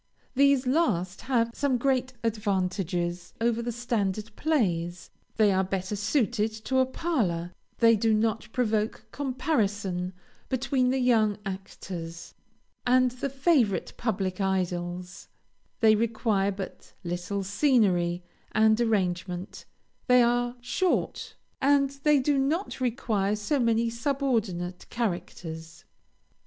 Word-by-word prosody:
These 275 -1 +4
last 210 - +1
have 230 -3 +2
some 275 -1 +1
great 260 0 0
advantages 185 -5 -1
over 230 0 +1
the 240 +1 -2
standard 220 -3 -2
plays; 180 - -1 0.2
they 215 -2 +4
are 190 0 +2
better 190 +1 -3
suited 215 - +1
to 260 0 +2
a 260 - +3
parlor; 205 - -1 0.2
they 230 -1 +6
do 220 +1 +2
not 220 +1 0
provoke 220 -3 0
comparison 205 - -1 0.4
between 260 0 +1
the 265 - +1
young 225 -5 +3
actors, 180 -3 -7 0.5
and 255 0 +4
the 255 +3 -4
favorite 270 - +1
public 195 -4 -2
idols; 180 -1 -2 0.5
they 220 -1 +7
require 215 -2 +1
but 190 -1 -8
little 180 +3 -3
scenery 190 -6 +2 0.3
and 220 +1 +4
arrangement; 185 -4 -1 0.4
they 250 -1 +6
are 245 +1 +1
short; 350 +10 -1 0.3
and 275 0 +4
they 300 0 +5
do 275 +1 +2
not 300 +3 -1
require 220 -5 0
so 215 +7 -1
many 230 -1 +2
subordinate 230 -8 -1
characters. 170 -7 -4
220 Hz, 115 wpm, -27 LUFS, 185-255 Hz, 0.5 s, they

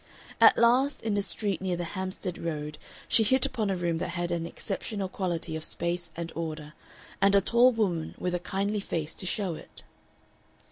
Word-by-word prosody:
At - - +8
last 255 +5 +3
in 220 -2 0
a 200 - +2
street 200 0 -2
near 185 -2 0
the 175 - -3
Hampstead 185 -2 -4
Road 150 -2 -4 0.3
she - - +5
hit 255 +4 +4
upon 220 -5 -1
a 195 - +1
room 170 -2 0
that - - -2
had 175 0 -1
an 170 -1 -1
exceptional 200 +2 -4
quality 175 -4 -2
of 160 - -4
space 170 +1 -2
and 170 0 -5
order, 155 -2 -5 0.5
and 200 0 +5
a - - +8
tall 235 +6 +5
woman 185 -9 -1
with 180 - -2
a 180 - 0
kindly 200 +4 -1
face 160 -5 -3
to 185 - -4
show 190 -1 -1
it. - - -10
185 Hz, 190 wpm, -28 LUFS, 170-205 Hz, 0.5 s, At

